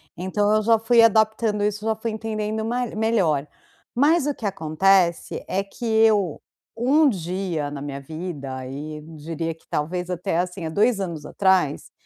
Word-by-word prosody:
Então, 205 Hz, +3 st, 0 dB
eu 215 Hz, -, +3 dB
já 225 Hz, 0 st, +3 dB
fui 230 Hz, +1 st, +4 dB
adaptando 220 Hz, -1 st, +3 dB
isso, 210 Hz, 0 st, -1 dB
já 220 Hz, -1 st, +1 dB
fui 225 Hz, +1 st, -4 dB
entendendo 220 Hz, 0 st, -3 dB
ma 245 Hz, +2 st, -1 dB
melhor, 205 Hz, -11 st, +1 dB, 0.5 s
mas 290 Hz, +4 st, +3 dB
o 290 Hz, -, +1 dB
que 225 Hz, -, -8 dB
acontece, 175 Hz, 0 st, +1 dB
é 195 Hz, -, 0 dB
que 200 Hz, +5 st, -9 dB
eu, 220 Hz, -6 st, +3 dB, 0.4 s
um 280 Hz, +5 st, +4 dB
dia 175 Hz, -, -3 dB
na 145 Hz, -1 st, -7 dB
minha 140 Hz, -1 st, -5 dB
vida, 150 Hz, -2 st, -6 dB
aí 145 Hz, +4 st, -6 dB, 0.2 s
diria 165 Hz, +2 st, -4 dB
que 160 Hz, -, -26 dB
talvez 180 Hz, +4 st, -2 dB
até 180 Hz, -1 st, -2 dB
assim, 180 Hz, -1 st, -2 dB
há -, -, -2 dB
2 210 Hz, +5 st, +2 dB
anos 165 Hz, -6 st, -4 dB
atrás, 185 Hz, -7 st, +1 dB
195 Hz, 165 wpm, -23 LUFS, 160-220 Hz, 0.5 s, fui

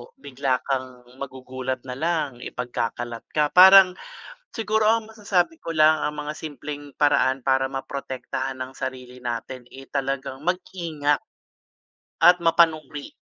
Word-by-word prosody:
bigla 135 Hz, -1 st, -2 dB
kang 130 Hz, -2 st, -4 dB, 0.2 s
magugulat 130 Hz, -1 st, -5 dB
na 125 Hz, -1 st, -7 dB
lang, 155 Hz, -6 st, -1 dB
ipagkakalat 120 Hz, -1 st, -4 dB
ka. 150 Hz, -1 st, +2 dB
Parang 190 Hz, 0 st, +8 dB, 0.6 s
siguro 220 Hz, -1 st, +1 dB
ang 220 Hz, 0 st, +2 dB
masasabi 210 Hz, -, 0 dB
ko 165 Hz, -, -6 dB
lang 155 Hz, 0 st, +5 dB
ang 150 Hz, -, -5 dB
mga 150 Hz, +1 st, -4 dB
simpleng 145 Hz, -1 st, -7 dB
paraan 135 Hz, -2 st, +2 dB
para 135 Hz, 0 st, +2 dB
maprotektahan 135 Hz, -1 st, -5 dB
ang 130 Hz, 0 st, -5 dB
sarili 125 Hz, -1 st, -6 dB
natin, 125 Hz, +1 st, -5 dB
eh, 135 Hz, 0 st, -11 dB
talagang 135 Hz, -1 st, -3 dB
mag-ingat 170 Hz, -5 st, -1 dB, 1.0 s
at 175 Hz, 0 st, +6 dB
mapanuri. 160 Hz, -4 st, +2 dB
140 Hz, 120 wpm, -24 LUFS, 130-165 Hz, 1.0 s, Parang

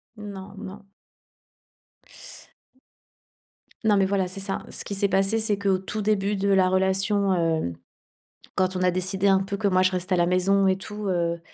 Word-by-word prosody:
Non, 200 Hz, -2 st, -9 dB
non. 200 Hz, +1 st, -10 dB, 3.0 s
Non 215 Hz, -2 st, +4 dB
mais 195 Hz, -, +3 dB
voilà, 190 Hz, -1 st, 0 dB
c'est 185 Hz, +2 st, -5 dB
ça. 195 Hz, 0 st, -3 dB
Ce -, -, -5 dB
qui 200 Hz, -, -5 dB
s'est 200 Hz, +1 st, +2 dB
passé, 195 Hz, +3 st, +2 dB
c'est 215 Hz, -2 st, +1 dB
qu'au 195 Hz, -1 st, +1 dB
tout 200 Hz, +3 st, -5 dB
début 205 Hz, -1 st, +1 dB
de 200 Hz, 0 st, -1 dB
la 190 Hz, -2 st, +4 dB
relation, 190 Hz, +1 st, +2 dB, 0.3 s
heu, 85 Hz, -, -3 dB, 0.8 s
quand 185 Hz, 0 st, +1 dB
on 185 Hz, -, -2 dB
a 185 Hz, -, +3 dB
décidé 185 Hz, +2 st, -1 dB
un 195 Hz, -1 st, +5 dB
peu 195 Hz, +1 st, -4 dB
que 205 Hz, -, 0 dB
moi 185 Hz, -1 st, +3 dB
je 185 Hz, -, +3 dB
reste 185 Hz, +1 st, -3 dB
à -, -, +4 dB
la 175 Hz, -1 st, +3 dB
maison 190 Hz, +2 st, +2 dB
et 190 Hz, -, +3 dB
tout, 210 Hz, +2 st, -7 dB
heu, 170 Hz, -2 st, 0 dB
195 Hz, 180 wpm, -25 LUFS, 185-200 Hz, 3.0 s, un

